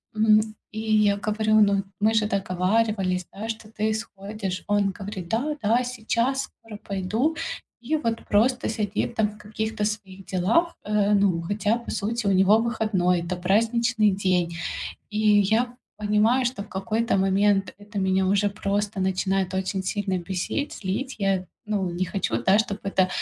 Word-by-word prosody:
м. 215 0 +5 0.3
И 215 - -5
я 215 -2 +3
говорю: 215 +1 +2
"Ну, 200 -1 +3 0.2
мы 215 +2 +4
же 220 -1 +3
договаривались, 190 -1 0
да, 210 +3 -6
что 220 -1 -5
ты 215 0 -1
исходишь". 200 -3 -5
Он 205 -1 +2
говорит: 195 -3 -6
"Да, 265 - -1
да, 230 +4 +2
сейчас 250 +2 0
скоро 225 -5 -11
пойду". 210 - -1 0.4
И 250 +6 -1
вот 230 -6 -2
просто 245 +5 +2
сидит 210 -2 -2
там 220 -1 +3
в 210 0 -11
каких-то 215 0 -3
своих 195 -3 -5
делах, 220 - +1
э, 210 0 +2
ну, 195 -4 +3
хотя, 205 +5 0
по 235 - -7
сути, 225 +2 -2
у - - +4
него 195 +3 +5
выходной, 215 -6 +1
это 170 +2 -3
праздничный 220 +4 +2
день. 180 -3 0 0.6
И 210 - -3 0.2
я 230 +5 +1 0.2
понимаю, 215 +5 +2
что 240 -4 -2
в 205 - -13
какой-то 220 +4 0
момент 195 +1 +2
это 205 0 -7
меня 190 0 +2
уже 200 +2 +3
просто 205 0 -2
начинает 190 0 0
очень 190 0 -1
сильно 190 -1 -1
бесить, 190 - -3
злить. 225 +8 -3
Я, 195 -2 0 0.2
ну, 200 -4 -1
не 175 +2 -1
хочу, 190 +2 -2
да, 195 +2 +4
чтобы 210 -2 -1
это 190 -1 +2
205 Hz, 160 wpm, -25 LUFS, 190-220 Hz, 0.6 s, м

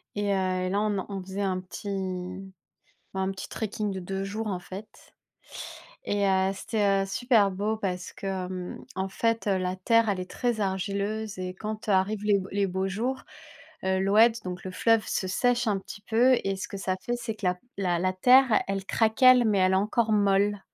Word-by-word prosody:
Et 205 0 -1
heu 185 -1 0
et - - -1
là 200 +2 +1
on 210 -1 0
en 190 - -4
on 195 -2 -5
faisait 190 +2 -4
un 185 -2 0
petit 190 0 -5 0.6
un 190 0 0
petit 190 - -7
trekking 215 -1 -3
de 190 - -4
2 195 +2 -4
jours, 215 +3 -4
en 190 -4 -2
fait 190 +4 -8 1.2
et 205 -1 +1
heu, 190 0 +3
c'était, 200 -1 +1
heu, - - -3
super 215 0 +3
beau 205 +3 -1
parce 185 -3 -4
que, - - -8
hem, 185 -1 -4
en 190 0 -2
fait, 230 +3 -1
heu, 195 -1 +2
la 185 0 -2
terre, 230 +4 +3
elle 195 -3 0
est 180 - -7
très 240 -3 -1
argileuse 200 +2 -2
et 185 0 -4
quand 215 +3 -6
arrivent 200 +2 +1
les 205 -1 +3
les 200 0 +1
beaux 190 +1 -1
jours, 235 +7 -2 0.6
heu, 190 0 +1
l'oued, 215 +4 +5
donc 180 0 -5
le 185 - -4
fleuve 225 +3 +2
se 190 - -1
sèche 245 +5 +1
un 205 -2 +1
petit 200 +2 -10
peu 245 +4 +4
et 195 0 -1
ce 190 - -5
que - - -6
ça 190 -1 -1
fait, 240 - -2
c'est 235 -2 -4
que 205 - -4
la 180 0 +2 0.2
la 180 -3 +1
la 185 +1 +1
terre, 250 +4 +5
elle 195 -1 -2
craquelle 245 +4 +5
mais 210 -2 +2
elle 185 0 +3
est - - +4
encore 220 +3 +1
molle 205 0 +2
195 Hz, 205 wpm, -27 LUFS, 190-215 Hz, 1.2 s, l'oued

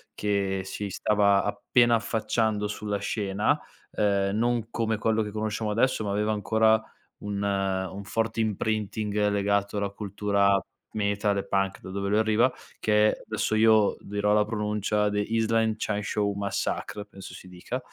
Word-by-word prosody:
che 100 -2 0
si 100 +1 -5
stava 100 0 +2
appena 120 +4 +2
affacciando 110 -2 0
sulla 105 0 -3
scena, 100 0 0 0.4
ehm, 100 -1 +1
non 115 0 0
come 110 -1 0
quello 110 +1 +1
che 105 - -3
conosciamo 110 +1 -2
adesso 115 +2 +1
ma 105 - -3
aveva 105 +2 0
ancora 110 +1 +3 0.4
un 100 -1 -4
un 95 -1 -1
forte 115 +2 -2
imprinting 105 -1 -1
legato 100 0 0
alla 100 0 -1
cultura 100 -1 +1 0.3
metal 100 -1 0
e 100 - -2
punk, 95 0 0
da 95 - -8
dove 100 +1 -2
lui 105 - +2
arriva, 110 +3 +3 0.3
che 105 0 +2
adesso 110 0 -2
io 110 -1 +4
dirò 105 +1 0
la 105 0 +4
pronuncia 105 -1 0
The 105 - 0
Island 110 +1 +1
Chain 105 -1 -2
Show 100 0 0
Massacre 100 +1 -3
penso 100 -2 -11
si - - -12
dica, 90 +8 -5
105 Hz, 150 wpm, -27 LUFS, 100-110 Hz, 0.4 s, io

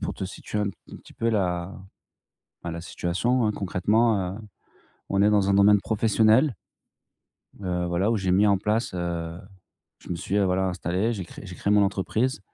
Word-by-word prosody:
pour - - -3
te - - -5
situer 100 +2 -6
un 105 - 0
p 100 - -7 0.2
un - - -7
petit - - -16
peu 115 - -1
la 90 -3 -1 0.9
bah, 85 - -4
la 85 0 -6
situation, 115 +9 0
hein. 105 - +2
Concrètement, 100 0 +1
heu, 110 - -9 0.7
on 100 0 +1
est 105 - +5
dans 100 -2 +3
un - - +3
domaine 100 0 +5
professionnel, 110 +4 +3 1.1
heu, 90 -1 -1
voilà, 85 +5 +1
où 115 - +2
j'ai 95 -3 -1
mis 100 +3 +4
en 100 -1 +4
place, 105 +1 -1
heu, 85 -1 -3 0.6
je - - -16
me 85 - -1
suis, 95 +3 -3
heu, 100 - +3
voilà, 95 +1 +1
installé, 90 +5 -1
j'ai 100 -5 -4
créé 85 - -12
j'ai 90 - -8
créé 100 - -2
mon 105 0 +5
entreprise 105 +6 -1
100 Hz, 195 wpm, -25 LUFS, 90-105 Hz, 1.1 s, est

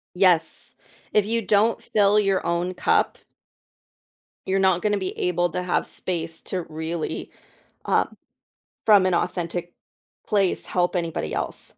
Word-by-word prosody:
Yes. 180 -4 +3 0.4
If 210 -2 +4
you 230 +2 0
don't 215 +2 +2
fill 205 0 +3
your 195 -2 +1
own 175 +2 -1
cup - - +1 1.3
you're 195 +1 +1
not 190 -2 +3
gonna 210 -1 +1
be 190 -1 -4
able 175 0 +1
to 180 - -3
have 180 - 0
space 165 -2 -3
to 185 -2 -3
really, 160 +1 -4 0.5
uh, - - +3 0.8
from 205 -4 +6
an 185 - +2
authentic 175 0 -2 0.5
place, 200 -3 +1
help 180 +1 0
anybody 170 -2 -2
else. - - -3
180 Hz, 135 wpm, -24 LUFS, 170-200 Hz, 1.3 s, from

